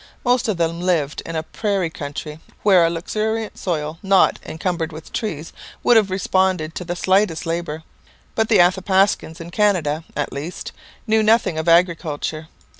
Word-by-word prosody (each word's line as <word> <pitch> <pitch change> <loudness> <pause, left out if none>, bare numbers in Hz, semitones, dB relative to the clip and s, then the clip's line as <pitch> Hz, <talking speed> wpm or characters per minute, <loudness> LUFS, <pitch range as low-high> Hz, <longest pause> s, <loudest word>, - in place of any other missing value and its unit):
Most 245 -1 +2
of 210 -5 0
them 165 0 -1
lived 165 -5 0
in 165 - -5
a 160 - -1
prairie 195 -2 -1
country 150 0 -6 0.2
where 190 -4 +6
a 165 - +3
luxuriant 215 +6 -2
soil, 160 -3 -3
not 195 -1 +3
encumbered 165 0 -3
with 155 0 -11
trees, 165 -8 -4 0.3
would 240 - +5
have 215 -3 +4
responded 185 -3 0
to 180 - -5
the 175 0 -4
slightest 185 -2 +1
labour. 165 -1 -3 0.5
But 220 -1 0
the 225 - +5
Athapascans, 190 -1 +2
in 170 +1 -8
Canada 170 -7 +1
at 145 - -2
least, 150 +6 -6 0.3
knew 220 -1 +3
nothing 215 -7 +3
of 160 +2 0
agriculture. 165 -2 +1
175 Hz, 160 wpm, -21 LUFS, 160-195 Hz, 0.5 s, where